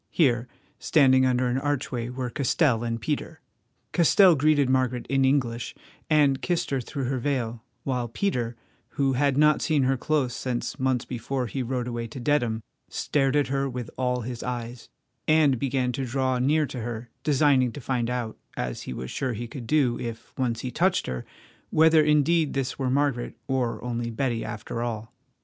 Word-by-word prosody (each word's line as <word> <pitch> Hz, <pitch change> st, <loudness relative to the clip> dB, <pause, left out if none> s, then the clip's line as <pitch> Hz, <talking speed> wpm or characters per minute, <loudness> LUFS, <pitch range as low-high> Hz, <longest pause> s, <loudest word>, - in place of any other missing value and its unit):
Here, 125 Hz, -7 st, +2 dB, 0.3 s
standing 130 Hz, -4 st, +4 dB
under 125 Hz, 0 st, +2 dB
an 125 Hz, +1 st, +1 dB
archway, 130 Hz, -4 st, -2 dB
were 125 Hz, -1 st, -4 dB
Castell 130 Hz, -3 st, +2 dB
and 115 Hz, -1 st, -2 dB
Peter. 145 Hz, +6 st, -3 dB, 0.5 s
Castell 180 Hz, +2 st, +6 dB
greeted 145 Hz, -1 st, +3 dB
Margaret 130 Hz, -1 st, +1 dB
in 135 Hz, -1 st, +3 dB
English 125 Hz, -3 st, 0 dB, 0.3 s
and 145 Hz, -3 st, +4 dB
kissed 175 Hz, -5 st, -1 dB
her 135 Hz, -2 st, 0 dB
through 135 Hz, +2 st, -5 dB
her 130 Hz, +1 st, -1 dB
veil, 120 Hz, -4 st, -2 dB, 0.2 s
while 125 Hz, -3 st, -1 dB
Peter, 120 Hz, -, -1 dB, 0.4 s
who 135 Hz, -1 st, +2 dB
had 140 Hz, +1 st, +2 dB
not 150 Hz, 0 st, +4 dB
seen 150 Hz, -4 st, +2 dB
her 135 Hz, +1 st, +2 dB
close 135 Hz, -2 st, 0 dB
since 125 Hz, -2 st, -3 dB
months 130 Hz, -1 st, +1 dB
before 125 Hz, +2 st, -3 dB
he 130 Hz, +3 st, -3 dB
rode 125 Hz, 0 st, -2 dB
away 120 Hz, -1 st, -3 dB
to 120 Hz, -, -8 dB
Dedham, 120 Hz, -5 st, +1 dB, 0.3 s
stared 135 Hz, -1 st, 0 dB
at 145 Hz, -2 st, +2 dB
her 135 Hz, 0 st, 0 dB
with 125 Hz, -3 st, -6 dB
all 125 Hz, -1 st, 0 dB
his 120 Hz, +1 st, -5 dB
eyes, 120 Hz, -1 st, -5 dB, 0.4 s
and 155 Hz, -5 st, +4 dB
began 130 Hz, -2 st, 0 dB
to 135 Hz, +2 st, -3 dB
draw 130 Hz, 0 st, 0 dB
near 150 Hz, +4 st, +3 dB
to 130 Hz, -3 st, -6 dB
her, 120 Hz, 0 st, -6 dB
designing 140 Hz, -4 st, +3 dB
to -, -, -7 dB
find 120 Hz, -2 st, -1 dB
out, 120 Hz, -3 st, -3 dB, 0.2 s
as 60 Hz, -1 st, -3 dB
he -, -, -3 dB
was 65 Hz, 0 st, -6 dB
sure 130 Hz, -3 st, -2 dB
he 120 Hz, +2 st, -5 dB
could 120 Hz, -2 st, -8 dB
do 135 Hz, -5 st, +2 dB
if 115 Hz, -1 st, -7 dB
once 120 Hz, -3 st, -1 dB
he 125 Hz, -, -4 dB
touched 185 Hz, +5 st, +1 dB
her, 65 Hz, -1 st, -5 dB, 0.4 s
whether 160 Hz, 0 st, +5 dB
indeed 150 Hz, +1 st, +3 dB
this 135 Hz, 0 st, -2 dB
were 130 Hz, -2 st, 0 dB
Margaret, 135 Hz, -2 st, 0 dB
or 130 Hz, -3 st, 0 dB
only 120 Hz, -1 st, -2 dB
Betty 115 Hz, 0 st, -1 dB
after 105 Hz, +2 st, -5 dB
all. 115 Hz, -2 st, -4 dB
130 Hz, 180 wpm, -26 LUFS, 120-140 Hz, 0.5 s, Castell